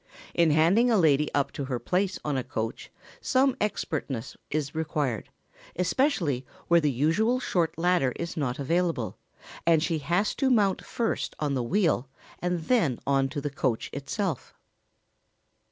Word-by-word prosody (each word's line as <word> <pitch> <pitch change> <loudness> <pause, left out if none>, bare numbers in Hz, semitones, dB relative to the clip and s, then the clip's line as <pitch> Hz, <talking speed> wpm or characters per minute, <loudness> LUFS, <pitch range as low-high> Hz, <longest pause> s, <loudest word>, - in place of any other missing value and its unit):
In 170 -2 +4
handing 170 +11 +4
a 225 - +4
lady 150 -4 +3
up 140 -1 +1
to 140 - -4
her 130 -2 -2
place 185 - 0
on 150 -2 0
a 130 - -1
coach 115 -3 -4 0.3
some 265 0 +2
expertness 145 - -2
is 145 -2 -2
required, 150 - -2 0.5
especially 180 - +1 0.2
where 170 0 +5
the 150 - +2
usual 165 - +2
short 175 -11 0
ladder 175 -6 +2
is 170 0 -5
not 130 -5 -1
available, 165 -4 -1 0.4
and 165 -2 +4
she 165 -2 0
has 175 +8 +1
to 270 - +2
mount 205 -6 +2
first 230 -2 -2
on 145 -2 0
the 130 - 0
wheel 145 - +1 0.3
and 180 -1 -1
then 160 - +2
on 135 -1 +2
to 145 +1 -4
the 145 0 -3
coach 130 -4 -1
itself. 155 - -3
160 Hz, 155 wpm, -27 LUFS, 140-185 Hz, 0.5 s, where